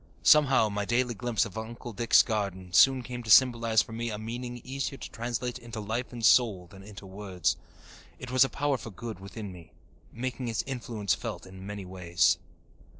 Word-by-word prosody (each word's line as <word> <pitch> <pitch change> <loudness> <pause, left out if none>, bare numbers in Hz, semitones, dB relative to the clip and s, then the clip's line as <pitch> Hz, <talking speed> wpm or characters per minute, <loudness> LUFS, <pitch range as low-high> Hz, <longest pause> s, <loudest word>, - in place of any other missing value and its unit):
Somehow, 140 -6 +6
my 105 0 -2
daily 120 +3 +1
glimpse 115 0 0
of 105 0 -6
Uncle 120 +1 -8
Dick's 115 +3 +5
garden 95 -5 -3
soon 130 +6 +6
came 125 0 -6
to 115 - -9
symbolize 115 -1 +5
for - - -13
me 115 +1 -3
a 105 - -4
meaning 120 +3 -5
easier 135 +1 -4
to - - -9
translate 120 +1 -3
into 115 -1 -8
life 110 +4 -3
and 120 -2 -3
soul 110 -6 +4
than 95 +2 -14
into 100 0 -11
words. 95 -2 -2 0.6
It 125 - -8
was 130 +1 +6
a 135 - 0
power 140 -2 -1
for 110 - -8
good 110 0 -7
within 100 +1 -8
me, 85 -2 -14 0.4
making 125 +1 -4
its 115 -2 -1
influence 115 -7 -2
felt - - -5
in 95 +1 -11
many 100 -2 -6
ways. 85 -2 +1
115 Hz, 190 wpm, -28 LUFS, 100-120 Hz, 0.6 s, Somehow